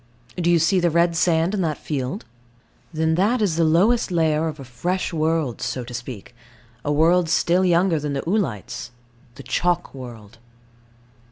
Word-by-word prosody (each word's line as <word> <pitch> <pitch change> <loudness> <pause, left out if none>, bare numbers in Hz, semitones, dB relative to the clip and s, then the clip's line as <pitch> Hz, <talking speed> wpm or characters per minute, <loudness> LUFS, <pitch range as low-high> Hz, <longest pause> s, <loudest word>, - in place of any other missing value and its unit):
Do 175 -1 0
you 175 - +5
see 165 +4 +3
the 175 -1 +2
red 170 +1 +2
sand 165 +2 +2
in 205 - 0
that 155 -4 -1
field? 145 +6 -4 0.7
Then 160 0 0
that 205 +9 +2
is 200 -7 +1
the 165 - +2
lowest 190 +11 +3
layer 160 -2 +1
of 155 -1 -6
a - - -7
fresh 175 +10 -3
world, 160 -5 -1
so 125 - -3
to 120 +1 -10
speak; 120 -2 -7 0.5
a 145 - -1
world 165 +3 +3
still 175 +3 +2
younger 175 -2 +3
than 145 -1 -3
the 140 +3 -4
oolites 165 - -2 0.5
the 140 - -10
chalk 175 +3 -1
world. 115 -4 -11
165 Hz, 170 wpm, -22 LUFS, 145-175 Hz, 0.7 s, you